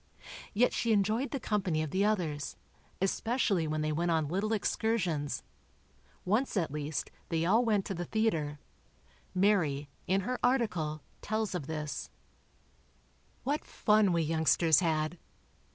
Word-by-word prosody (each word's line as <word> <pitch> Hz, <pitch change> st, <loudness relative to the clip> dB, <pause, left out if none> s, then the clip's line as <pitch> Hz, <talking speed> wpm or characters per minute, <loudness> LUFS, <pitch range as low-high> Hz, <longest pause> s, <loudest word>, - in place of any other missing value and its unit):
Yet 245 Hz, +4 st, +4 dB
she 230 Hz, -1 st, +1 dB
enjoyed 215 Hz, +6 st, +1 dB
the 275 Hz, -, -3 dB
company 185 Hz, -9 st, 0 dB
of 155 Hz, -, -5 dB
the 190 Hz, +2 st, +2 dB
others, 170 Hz, -9 st, -1 dB, 0.4 s
especially 195 Hz, -3 st, +1 dB
when 155 Hz, 0 st, -1 dB
they 155 Hz, 0 st, 0 dB
went 170 Hz, +3 st, 0 dB
on 160 Hz, -3 st, +1 dB
little 195 Hz, +6 st, -1 dB
excursions. 190 Hz, -8 st, 0 dB, 0.8 s
Once 215 Hz, +5 st, +1 dB
at 165 Hz, -6 st, 0 dB
least, 150 Hz, +1 st, -3 dB, 0.2 s
they 165 Hz, -1 st, 0 dB
all 220 Hz, +7 st, +4 dB
went 210 Hz, -4 st, +2 dB
to -, -, -3 dB
the 175 Hz, -1 st, -4 dB
theatre. 165 Hz, -10 st, 0 dB, 0.8 s
Mary, 165 Hz, -8 st, +2 dB, 0.2 s
in 190 Hz, +2 st, +2 dB
her 250 Hz, +6 st, -2 dB
article, 180 Hz, -, 0 dB, 0.2 s
tells 215 Hz, -1 st, -1 dB
of 165 Hz, -6 st, -4 dB
this: 150 Hz, -2 st, -4 dB, 1.3 s
What 290 Hz, +3 st, -1 dB
fun 210 Hz, -2 st, +3 dB
we 170 Hz, -1 st, +2 dB
youngsters 160 Hz, 0 st, +4 dB
had! 160 Hz, -1 st, 0 dB
180 Hz, 135 wpm, -31 LUFS, 155-215 Hz, 1.3 s, Yet